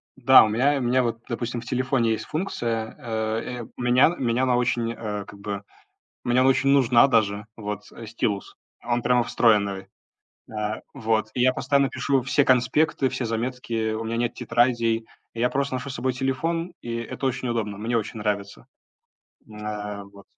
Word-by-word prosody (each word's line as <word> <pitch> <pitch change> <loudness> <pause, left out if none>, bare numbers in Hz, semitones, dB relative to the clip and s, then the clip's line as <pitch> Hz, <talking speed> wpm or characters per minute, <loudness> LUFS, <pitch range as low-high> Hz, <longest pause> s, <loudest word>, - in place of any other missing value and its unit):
да, - - +7
у - - +2
меня 135 +7 +2
у - - -2
меня 125 +1 +2
вот, 115 -1 -2
допустим, 120 -1 -3
в - - -13
телефоне 125 -1 +1
есть 110 - -4
функция, 115 - -3
а, 110 -3 -2
э, 125 -2 -6
у - - -8
меня 125 +7 +4
меня 120 0 0
она 130 -1 +3
очень, 120 -1 0
э, 105 -3 -5
как 100 - -13
бы 100 0 -5 0.6
мне 120 +1 +3
очень 135 +1 +3
нужна 130 -3 +5
даже 105 -4 +1
вот, 105 -2 -5
э, 115 - -9
стилус. 105 -2 -3 0.3
Он 120 0 -1
прямо 125 0 +3
встроенный. 100 -5 +2 0.6
А, 105 0 -3
вот. 110 -1 0
И 125 - -1
я 130 +1 +4
постоянно 140 +1 +1
пишу 135 -2 0
все 135 +2 +3
конспекты, 130 +2 +2
все 125 - -3
заметки, 115 -1 -2
у 110 - -3
меня 115 +1 -2
нет 120 0 0
тетрадей. 115 -2 +1 0.3
Я 120 +2 +1
просто 140 0 -1
ношу 135 +2 -5
с 130 - -5
собой 130 +2 -1
телефон, 165 +7 -2
и 115 -1 -4
это 115 +3 -5
очень 130 -1 -1
удобно. 105 -4 -2
Мне 115 +3 -1
очень 110 0 -4
нравится. 100 -1 -3 1.0
А, 105 -1 -5
вот. 100 0 -16
120 Hz, 175 wpm, -24 LUFS, 110-130 Hz, 1.0 s, да